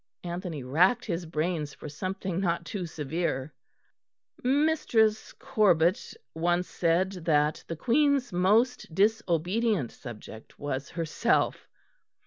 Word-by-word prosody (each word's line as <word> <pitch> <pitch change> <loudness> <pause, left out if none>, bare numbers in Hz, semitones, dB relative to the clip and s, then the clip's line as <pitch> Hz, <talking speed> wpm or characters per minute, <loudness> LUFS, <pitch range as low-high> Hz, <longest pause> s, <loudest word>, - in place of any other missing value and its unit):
Anthony 175 -4 -5
racked 180 - +3
his 170 -4 -3
brains 155 -2 -2
for - - -9
something 185 +4 -4
not 170 -2 -1
too 185 -3 -4
severe. 155 -2 -3 0.9
"Mistress 255 -6 +2
Corbet 200 -9 +2 0.2
once 175 +2 0
said 175 +3 +1
that 150 -1 +2
the 165 - -4
Queen's 265 - +2
most 210 +2 +2
disobedient 200 - +1
subject 110 -2 -11
was 140 -1 -4
herself." 165 -2 0
175 Hz, 105 wpm, -28 LUFS, 160-215 Hz, 0.9 s, racked